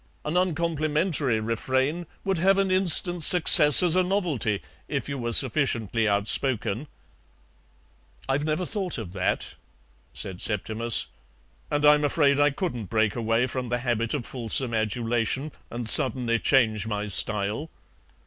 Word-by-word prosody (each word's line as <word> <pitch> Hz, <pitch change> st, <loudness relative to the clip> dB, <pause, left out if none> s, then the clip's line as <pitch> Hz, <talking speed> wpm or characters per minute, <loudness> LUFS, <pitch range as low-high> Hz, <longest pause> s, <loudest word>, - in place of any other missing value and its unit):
An 150 Hz, +3 st, -3 dB
uncomplimentary 155 Hz, -, -1 dB
refrain 130 Hz, +9 st, -2 dB, 0.2 s
would 190 Hz, -3 st, -2 dB
have 195 Hz, +3 st, +2 dB
an 195 Hz, -1 st, 0 dB
instant 180 Hz, -1 st, +3 dB
success 160 Hz, -2 st, +6 dB
as 175 Hz, -1 st, +3 dB
a 185 Hz, -, +3 dB
novelty 175 Hz, -, -1 dB, 0.3 s
if 140 Hz, -2 st, -4 dB
you 140 Hz, -1 st, -5 dB
were 120 Hz, -1 st, -3 dB
sufficiently 115 Hz, -4 st, +1 dB
outspoken." 110 Hz, +4 st, -1 dB, 1.4 s
"I've 135 Hz, +2 st, -1 dB
never 155 Hz, +4 st, -2 dB
thought 190 Hz, -5 st, -4 dB
of 100 Hz, -6 st, -8 dB
that," 95 Hz, -2 st, -2 dB, 0.6 s
said 90 Hz, -2 st, -6 dB
Septimus, 110 Hz, +2 st, 0 dB, 0.6 s
"and 145 Hz, 0 st, -1 dB
I'm 150 Hz, 0 st, +5 dB
afraid 145 Hz, -1 st, +1 dB
I 145 Hz, 0 st, +4 dB
couldn't 140 Hz, -, -5 dB
break 110 Hz, +1 st, -1 dB
away 115 Hz, +1 st, 0 dB
from 130 Hz, -1 st, -5 dB
the 120 Hz, -, -1 dB
habit 120 Hz, 0 st, -2 dB
of 130 Hz, -5 st, -5 dB
fulsome 120 Hz, 0 st, 0 dB
adulation 115 Hz, +5 st, -2 dB, 0.2 s
and 120 Hz, -1 st, -5 dB
suddenly 125 Hz, -3 st, +5 dB
change 110 Hz, -5 st, +1 dB
my 105 Hz, -1 st, -4 dB
style." 105 Hz, -, -2 dB
130 Hz, 135 wpm, -24 LUFS, 115-155 Hz, 1.4 s, success